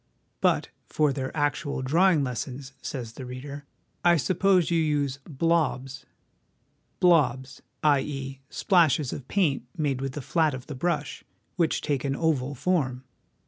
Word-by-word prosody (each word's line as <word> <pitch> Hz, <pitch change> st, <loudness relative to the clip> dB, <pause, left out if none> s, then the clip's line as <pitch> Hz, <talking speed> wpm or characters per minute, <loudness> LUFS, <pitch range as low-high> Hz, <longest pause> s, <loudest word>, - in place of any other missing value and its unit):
But -, -, +2 dB, 0.2 s
'for 150 Hz, -3 st, +1 dB
their 130 Hz, -1 st, -3 dB
actual 145 Hz, -2 st, -1 dB
draw 165 Hz, +9 st, +4 dB
ing 155 Hz, -5 st, +2 dB
lessons/ 130 Hz, +2 st, -5 dB
says 120 Hz, -5 st, -5 dB
the 130 Hz, -, -8 dB
reader, 140 Hz, +3 st, -7 dB, 0.2 s
' -, -, -44 dB
I -, -, +4 dB
suppose 180 Hz, +5 st, +2 dB
you 170 Hz, -, +3 dB
use 145 Hz, -3 st, 0 dB
" -, -, -18 dB
blobs 135 Hz, -6 st, 0 dB, 0.3 s
"? -, -, -44 dB
' -, -, -44 dB
' -, -, -44 dB
blobs,' 130 Hz, -7 st, +2 dB, 0.2 s
i.e. 135 Hz, -2 st, 0 dB
splashes 155 Hz, -7 st, +2 dB
of 135 Hz, -, -7 dB
paint 150 Hz, -11 st, +1 dB
made 140 Hz, -4 st, 0 dB
with 135 Hz, -1 st, -3 dB
the 145 Hz, -, -5 dB
flat 160 Hz, -3 st, +1 dB
of 130 Hz, -1 st, -8 dB
the 150 Hz, -, -7 dB
brush, 150 Hz, -1 st, -2 dB, 0.3 s
which 170 Hz, -3 st, +1 dB
take 140 Hz, -4 st, -1 dB
an 135 Hz, -1 st, -1 dB
oval 145 Hz, -3 st, 0 dB
form. 130 Hz, -5 st, 0 dB
140 Hz, 165 wpm, -26 LUFS, 130-160 Hz, 0.3 s, draw